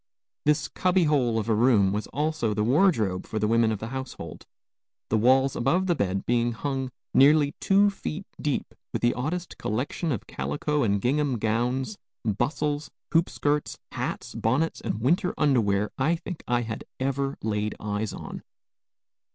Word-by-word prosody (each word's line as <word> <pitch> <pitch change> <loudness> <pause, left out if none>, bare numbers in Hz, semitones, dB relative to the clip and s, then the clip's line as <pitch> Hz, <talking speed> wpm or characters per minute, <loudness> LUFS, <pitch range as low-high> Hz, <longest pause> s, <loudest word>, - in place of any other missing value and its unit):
This 150 0 +2
cubby 185 0 +2
hole 130 -7 +2
of 110 -1 -1
a 115 - +3
room 110 -4 +4
was 105 +1 -2
also 145 -6 -1
the 105 - +1
wardrobe 115 - +2
for 110 - -4
the 105 0 +1
women 115 0 +3
of 110 - -1
the 110 +3 -6
household, 130 -11 -7 0.6
the 110 - +2
walls 130 +3 +4
above 180 +10 +2
the 180 - +3
bed 95 - -1
being 120 0 +1
hung 135 +2 -2 0.2
nearly 145 +1 +6
two 200 +1 +4
feet 195 -1 -5 0.2
deep 145 -2 -2 0.2
with - - -2
the 120 - +4
oddest 165 +7 -4
collection 135 - -2
of 120 - -3
calico 75 - -2
and 100 -5 +1
gingham 140 +1 +1
gowns, 125 - -1 0.3
bustles, 145 +7 -1 0.2
hoopskirts, 150 -3 +1
hats, - - -4
bonnets, 135 +9 0
and 110 - -3
winter 175 +8 +2
underwear 105 -9 +2
I 155 +6 +3
think 170 0 -7
I 120 0 +2
had 110 0 -5 0.2
ever 135 +1 -1
laid 105 -1 -1
eyes 105 0 -2
on. - - -7
130 Hz, 160 wpm, -26 LUFS, 110-150 Hz, 0.6 s, nearly